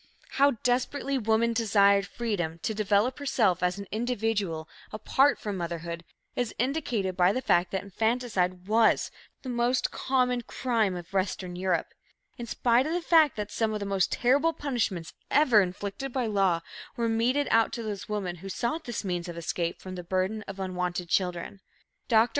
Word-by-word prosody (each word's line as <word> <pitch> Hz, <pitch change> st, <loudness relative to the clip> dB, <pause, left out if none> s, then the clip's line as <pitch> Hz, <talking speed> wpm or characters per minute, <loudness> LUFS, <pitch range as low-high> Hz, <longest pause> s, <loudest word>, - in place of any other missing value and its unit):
How 280 Hz, +1 st, +4 dB
desperately 265 Hz, +2 st, 0 dB
woman 225 Hz, +1 st, +2 dB
desired 200 Hz, -3 st, +4 dB
freedom 195 Hz, -9 st, -3 dB
to 220 Hz, -, -1 dB
develop 210 Hz, +5 st, +1 dB
herself 215 Hz, -10 st, +1 dB
as 180 Hz, +1 st, +1 dB
an 200 Hz, -, -6 dB
individual, 215 Hz, -8 st, -1 dB, 0.2 s
apart 265 Hz, +6 st, +2 dB
from 205 Hz, -2 st, -4 dB
motherhood, 170 Hz, -1 st, -4 dB, 0.3 s
is 245 Hz, -3 st, -2 dB
indicated 245 Hz, -, -1 dB
by 180 Hz, 0 st, +4 dB
the 255 Hz, -, -1 dB
fact 175 Hz, -8 st, +2 dB
that 190 Hz, -, -3 dB
infanticide 200 Hz, -4 st, -1 dB
was 220 Hz, +1 st, +3 dB, 0.3 s
"the 260 Hz, -, -5 dB
most 245 Hz, +1 st, +1 dB
common 250 Hz, -2 st, +1 dB
crime 230 Hz, -5 st, 0 dB
of 175 Hz, +1 st, -9 dB
Western 185 Hz, -1 st, -1 dB
Europe," 180 Hz, -1 st, -1 dB, 0.4 s
in 240 Hz, -2 st, -7 dB
spite 240 Hz, +4 st, +2 dB
of 320 Hz, -, -1 dB
the 350 Hz, -, 0 dB
fact 320 Hz, -4 st, +5 dB
that 210 Hz, -2 st, -4 dB
some 220 Hz, -1 st, 0 dB
of -, -, -2 dB
the 200 Hz, -, -4 dB
most 195 Hz, -1 st, +1 dB
terrible 285 Hz, +7 st, +3 dB
punishments 225 Hz, -, -2 dB, 0.2 s
ever 250 Hz, -8 st, +5 dB
inflicted 200 Hz, +8 st, -4 dB
by 255 Hz, -1 st, -1 dB
law 195 Hz, -6 st, +2 dB, 0.4 s
were 235 Hz, -1 st, +1 dB
meted 245 Hz, +6 st, +1 dB
out 225 Hz, 0 st, +4 dB
to 235 Hz, -, -4 dB
those 210 Hz, -2 st, -5 dB
women 195 Hz, -4 st, -3 dB
who 195 Hz, +4 st, -8 dB
sought 240 Hz, -, -2 dB
this 240 Hz, -3 st, -4 dB
means 175 Hz, -1 st, -2 dB
of 170 Hz, -, -7 dB
escape 170 Hz, +1 st, -2 dB
from 185 Hz, -, -8 dB
the 180 Hz, -1 st, -6 dB
burden 190 Hz, +4 st, -1 dB
of 195 Hz, 0 st, -7 dB
unwanted 180 Hz, -2 st, -3 dB
children. 180 Hz, +2 st, -1 dB, 0.5 s
Dr. 225 Hz, +1 st, +4 dB
210 Hz, 170 wpm, -28 LUFS, 185-245 Hz, 0.5 s, fact